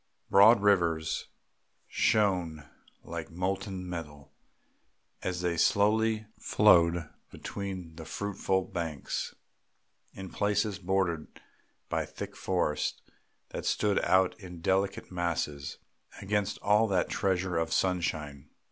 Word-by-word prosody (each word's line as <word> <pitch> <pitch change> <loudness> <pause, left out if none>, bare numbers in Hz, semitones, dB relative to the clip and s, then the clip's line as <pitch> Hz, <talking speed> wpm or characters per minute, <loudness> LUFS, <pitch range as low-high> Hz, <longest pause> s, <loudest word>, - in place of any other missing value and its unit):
Broad 100 +3 +7
rivers 85 -6 +2 0.6
shone 90 -8 +1 0.4
like - - -6
molten 95 +1 -3
metal 75 -5 -7 0.9
as 90 -1 -2
they 85 -1 0
slowly 110 +4 +3
flowed 85 -5 +4 0.2
between 95 -5 -6
fruitful 95 +3 -1
banks, 80 -6 -4 0.8
in 95 -1 -8
places 105 0 0
bordered 90 -4 0 0.6
by - - -1
thick - - -7
forests 90 -5 -1 0.5
that - - -5
stood 105 -2 +2
out 95 -1 +4
in 90 -4 -9
delicate 95 +3 0
masses 85 -5 -2 0.4
against 105 0 -1
all 105 +2 +4
that 95 -4 +1
treasure 95 -2 0
of 80 0 -1
sunshine. 80 -6 -1
90 Hz, 100 wpm, -30 LUFS, 85-100 Hz, 0.9 s, Broad